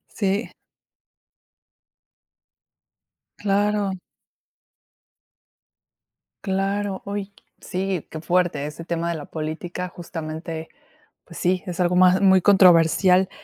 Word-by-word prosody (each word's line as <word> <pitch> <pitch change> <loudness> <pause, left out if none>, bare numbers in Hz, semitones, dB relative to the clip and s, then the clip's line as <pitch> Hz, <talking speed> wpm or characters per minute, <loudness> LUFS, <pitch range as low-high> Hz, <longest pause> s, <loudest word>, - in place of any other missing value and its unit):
Sí. 200 +1 -1 2.9
Claro. 205 0 0 2.5
Claro, 195 0 -1
uy, 200 0 -5 0.3
sí, 185 -2 -3
qué 160 - -6
fuerte 175 -4 0
ese 165 +2 -9
tema 170 0 -2
de 170 - -1
la 150 - -7
política, 170 +3 -5
justamente, 160 -1 -7 0.5
pues - - -13
sí, 185 +1 0
es 175 -1 -5
algo 180 0 +2
más 185 +1 +5
muy 190 -2 +5
controversial, 185 0 +5
180 Hz, 90 wpm, -23 LUFS, 165-195 Hz, 2.9 s, más